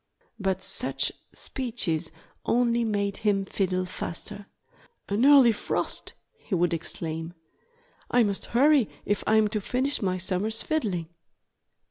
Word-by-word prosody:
But 190 -2 -1
such - - +2 0.2
speeches 220 -13 -2 0.3
only 235 0 +2
made 200 -3 -1
him 200 -2 +1
fiddle 185 -1 -1
the 180 - -8
faster. 205 +4 -5 0.6
"An 205 +4 0
early 275 -5 +8
frost!" 215 - -3 0.3
he 200 - -3
would 175 -1 +2
exclaim. 165 0 -4 0.7
"I 245 -1 +4
must 200 -2 -1
hurry 275 -1 +4 0.2
if 205 - 0
I'm 220 0 +4
to 215 -1 -2
finish 260 +7 -1
my 185 -2 0
summer's 190 +5 -1
fiddling." 200 - -1
205 Hz, 125 wpm, -27 LUFS, 185-235 Hz, 0.7 s, early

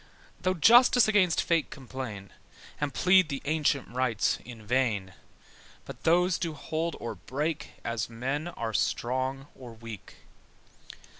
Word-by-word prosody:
Though 185 0 +1
justice 240 - +6
against 195 -6 +3
fate 165 -3 +1
complain, 130 -8 -7 0.5
And 145 -1 -1
plead 185 +2 +4
the 140 -2 -3
ancient 150 -2 +1
rights 125 -3 0
in 115 -3 -11
vain: 110 -6 0 0.7
But - - -11
those 175 +2 +3
do 165 -3 -3
hold 160 +3 -3
or 115 - -4
break 150 +4 -4
As 115 -1 -2
men 135 +7 -3
are 115 -10 -4
strong 130 +8 -1
or 125 -3 -11
weak. 115 -3 -10
135 Hz, 130 wpm, -28 LUFS, 115-165 Hz, 0.7 s, justice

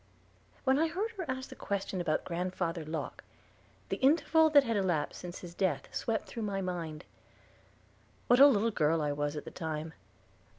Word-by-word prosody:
When 265 +1 +3
I 325 - +3
heard 390 +8 -2
her 385 -5 -5
ask 260 0 -4
the - - -9
question 195 -2 -3
about 155 -3 0
Grandfather 175 -1 -2
Locke, 155 -1 -5 0.7
the - - -1
interval 315 +3 +4
that 290 -2 +7
had 230 -3 -1
elapsed 180 -7 0
since 175 0 -7
his 175 -2 -9
death 170 -8 -1
swept 225 -1 -2
through 230 - -6
my 200 -2 -2
mind. 170 -5 -4 1.2
What 245 - +5
a 280 - +11
little 230 -4 +3
girl 160 -3 +2
I 145 - 0
was 145 +1 -2
at 150 - -5
the - - -7
time! 160 -1 -4
185 Hz, 175 wpm, -31 LUFS, 160-260 Hz, 1.2 s, a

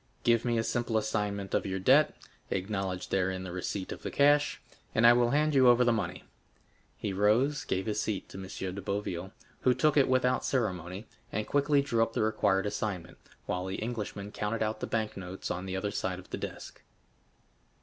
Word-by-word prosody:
Give 115 -1 +3
me 120 -1 +1
a 115 - +1
simple 120 -1 0
assignment 105 -2 -2
of - - +2
your 95 0 -2
debt; 130 +11 +4 0.3
acknowledge 95 -1 -2
therein 95 -1 0
the 90 - -6
receipt 95 +2 -4
of - - -6
the - - -4
cash, 145 +1 +3 0.4
and 110 - +4
I 120 - +9
will 120 0 +3
hand 150 +3 +2
you 130 -2 +6
over 120 0 +6
the 120 - +4
money." 110 - -3 0.7
He 100 - -3
rose, 115 +9 +2
gave 95 +1 -1
his 105 -1 -1
seat 105 -3 -3
to - - -8
M. 95 -1 -5
de 100 - -5
Boville, 95 -2 -3 0.3
who 125 -1 +3
took 155 -1 +3
it 140 - +5
without 130 0 +2
ceremony, 95 - -2 0.3
and 110 +1 -2
quickly 145 0 +2
drew 115 -5 +1
up 115 0 +1
the - - +1
required 105 -3 +2
assignment, 100 -4 -3 0.3
while 90 +1 -2
the 95 - -3
Englishman 105 -3 -4
counted 105 +2 -1
out 110 0 -2
the - - -3
bank 110 -2 -1
notes 95 0 -6
on 90 +2 -4
the 95 - -3
other 100 +2 -2
side 95 -2 -2
of 90 - -13
the - - -2
desk. - - -7
105 Hz, 200 wpm, -30 LUFS, 95-120 Hz, 0.7 s, I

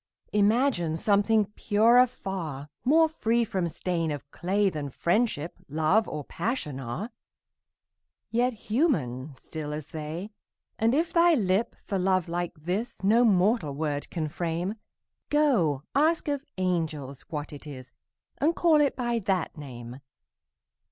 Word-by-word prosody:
Imagine 210 - +2
something 205 +3 +3
purer 230 +5 +5
far, 170 - -6
More 320 +5 +5
free 235 -7 +1
from 190 -5 -1
stain 170 0 -2
of 145 -1 -6
clay 195 +3 +1
Than 150 -6 -3
Friendship, 170 - 0
Love, 160 +9 +2
or 150 -1 -4
Passion 150 - -3
are, 135 - -5 1.2
Yet 245 +2 +2
human, 160 - -1
still 150 +2 -6
as 150 -1 -6
they: 160 +6 -5 0.5
And 230 +3 +3
if 325 +2 0
thy 340 -1 +5
lip, 200 -2 +1
for 195 -3 -4
love 185 -1 +2
like 175 0 -3
this, 200 +7 -3
No 225 +5 +5
mortal 190 - +3
word 145 -1 -2
can 160 -3 -2
frame, 170 +4 -2 0.6
Go, 220 - +2
ask 315 +3 +2
of 285 -2 -2
angels 160 -7 -2
what 150 -2 -5
it 145 +1 -10
is, 130 -3 -9 0.5
And 320 +4 +2
call 320 -3 +4
it 285 - +2
by 240 -2 0
that 190 -4 -1
name! 125 -4 -9
185 Hz, 135 wpm, -27 LUFS, 155-235 Hz, 1.2 s, purer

